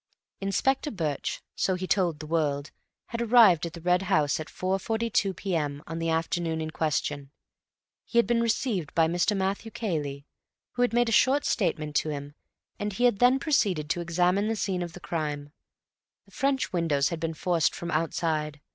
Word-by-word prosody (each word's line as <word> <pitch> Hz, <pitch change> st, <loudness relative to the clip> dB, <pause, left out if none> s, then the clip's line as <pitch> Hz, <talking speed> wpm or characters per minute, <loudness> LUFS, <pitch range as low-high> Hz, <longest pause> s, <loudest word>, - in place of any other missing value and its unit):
Inspector 265 Hz, +9 st, 0 dB
Birch, 160 Hz, -, -3 dB
so 190 Hz, -, +1 dB
he 185 Hz, +1 st, -4 dB
told 180 Hz, -5 st, +1 dB
the 155 Hz, -, -8 dB
world, 150 Hz, -3 st, -1 dB, 0.4 s
had 235 Hz, -1 st, -3 dB
arrived 215 Hz, -9 st, +6 dB
at 165 Hz, -, -9 dB
the 170 Hz, -, -9 dB
Red 180 Hz, +1 st, +2 dB
House 150 Hz, -1 st, +2 dB
at 155 Hz, -, -5 dB
4.42 200 Hz, +1 st, -1 dB
p.m. 150 Hz, -6 st, -2 dB
on 165 Hz, 0 st, -5 dB
the 165 Hz, 0 st, -1 dB
afternoon 165 Hz, 0 st, -1 dB
in 155 Hz, 0 st, -4 dB
question. 145 Hz, -3 st, -2 dB, 0.7 s
He 235 Hz, -, -4 dB
had 235 Hz, -, +6 dB
been 230 Hz, +2 st, +2 dB
received 220 Hz, -, -1 dB
by 165 Hz, -1 st, +4 dB
Mr. 175 Hz, +5 st, +1 dB
Matthew 195 Hz, +3 st, -2 dB
Cayley, 150 Hz, -11 st, -3 dB, 0.5 s
who 245 Hz, -, -3 dB
had 245 Hz, -, +3 dB
made 240 Hz, 0 st, +2 dB
a -, -, -1 dB
short 265 Hz, +6 st, +4 dB
statement 160 Hz, -7 st, -1 dB
to 155 Hz, -, 0 dB
him, 145 Hz, -1 st, -5 dB, 0.5 s
and 205 Hz, 0 st, -2 dB
he 240 Hz, -, -2 dB
had 240 Hz, -5 st, +4 dB
then 250 Hz, +2 st, +5 dB
proceeded 195 Hz, -, +1 dB
to 175 Hz, -, -1 dB
examine 180 Hz, +4 st, +1 dB
the 225 Hz, -, 0 dB
scene 190 Hz, -3 st, -1 dB
of 170 Hz, -1 st, -5 dB
the 180 Hz, -, -9 dB
crime. 150 Hz, -4 st, -4 dB, 0.7 s
The -, -, -23 dB
French 270 Hz, -5 st, 0 dB
windows 150 Hz, -5 st, +1 dB
had 170 Hz, -, -4 dB
been 165 Hz, 0 st, -3 dB
forced 170 Hz, 0 st, +1 dB
from 170 Hz, 0 st, -5 dB
outside. 155 Hz, -2 st, -1 dB
175 Hz, 180 wpm, -27 LUFS, 155-210 Hz, 0.7 s, arrived